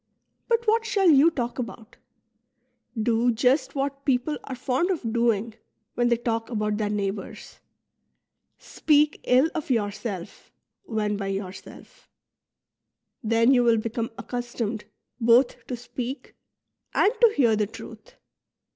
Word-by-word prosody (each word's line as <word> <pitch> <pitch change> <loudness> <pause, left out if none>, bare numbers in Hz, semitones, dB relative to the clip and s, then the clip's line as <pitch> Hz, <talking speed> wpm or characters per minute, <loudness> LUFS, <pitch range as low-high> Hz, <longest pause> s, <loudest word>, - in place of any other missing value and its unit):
But 470 0 +1
what 445 +1 +3
shall 395 -5 +3
you 295 +3 +6
talk 245 -6 -4
about? 235 -2 -7 1.0
Do 230 +2 +2
just 250 +7 +1
what 275 0 -3
people 270 +2 0
are 265 - -5
fond 255 +7 -1
of 260 -12 -2
doing 230 -2 +1 0.4
when 240 0 +1
they 235 - +3
talk 230 -1 -2
about 210 -3 -1
their 210 -1 -1
neighbours, 200 -1 -5 0.5
— - - -54 0.2
speak 300 -1 +3
ill 260 +6 +4
of 310 -3 -4
yourself 205 -5 -3 0.3
when 210 - -1
by 200 -1 -4
yourself; 195 -1 -8 1.1
then 230 +3 +3
you 245 -2 +4
will 230 -1 +4
become 230 +1 -3
accustomed 240 -3 -4 0.3
both 240 +2 +3
to 250 - -4
speak 250 +2 -6 0.6
and 415 - +4
to 465 -2 +6
hear 235 -6 +4
the 210 -1 0
truth. - - -12
240 Hz, 130 wpm, -25 LUFS, 220-275 Hz, 1.1 s, you